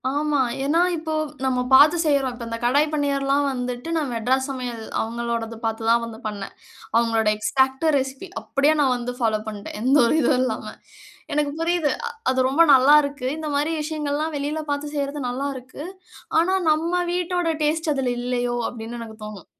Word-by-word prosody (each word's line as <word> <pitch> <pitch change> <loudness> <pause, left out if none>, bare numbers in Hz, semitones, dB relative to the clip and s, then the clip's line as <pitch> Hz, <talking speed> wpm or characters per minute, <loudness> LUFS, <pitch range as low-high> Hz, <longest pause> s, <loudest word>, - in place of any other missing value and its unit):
ஆமா. 295 -1 +1 0.2
ஏனா 310 +5 +2
இப்போ 315 -1 -4 0.3
நம்ம 255 -1 +1
பார்த்து 295 +6 +7
செய்றோம். 280 -4 +2
இப்ப 240 -1 -7
இந்த 230 - -3
கடாய் 290 +5 +3
பன்னீர்லாம் 280 -1 +1
வந்துட்டு 250 +2 -4
நான் 295 -5 -1
மெட்ராஸ் 260 +4 +1
சமையல் 250 -4 -5 0.2
அவங்களோடது 230 0 -3
பார்த்து 225 0 -2
தான் 235 0 +4
வந்து 225 -1 -9
பண்ணேன். 205 -2 -6 0.4
அவங்களோட 230 -1 +2
எக்ஸாக்ட் 265 +6 +1
ரெசிப்பி 270 +7 -4
அப்டியே 285 +2 +2
நான் 265 -3 +3
வந்து 245 +1 -4
ஃபாலோ 220 -3 +1
பண்ட்டேன். 210 -1 -6
எந்த 260 +4 +3
ஒரு 235 - +2
இதுவும் 255 - +3
இல்லாம 255 - -3 0.6
எனக்கு 295 -1 +1
புரியுது. 330 -3 +1 0.4
அது 260 - +1
ரொம்ப 280 +5 +3
நல்லாருக்கு. 285 0 +4
இந்த 315 -1 -5
மாரி 295 +3 +1
விஷயங்கள்லாம் 305 0 -2
வெளில 290 +2 -2
பார்த்து 290 +1 -3
செய்றது 285 0 -2
நல்லாருக்கு. 260 +1 -5 0.6
ஆனா 355 +3 +2 0.2
நம்ம 325 +3 0 0.2
வீட்டோட 355 -1 0
டேஸ்ட் 315 +1 +1
அதுல 260 -2 0
இல்லயோ 245 0 -1
அப்டின்னு 235 0 -7
எனக்கு 220 -1 -9
தோணும். 210 -4 -9
270 Hz, 160 wpm, -23 LUFS, 240-300 Hz, 0.6 s, பார்த்து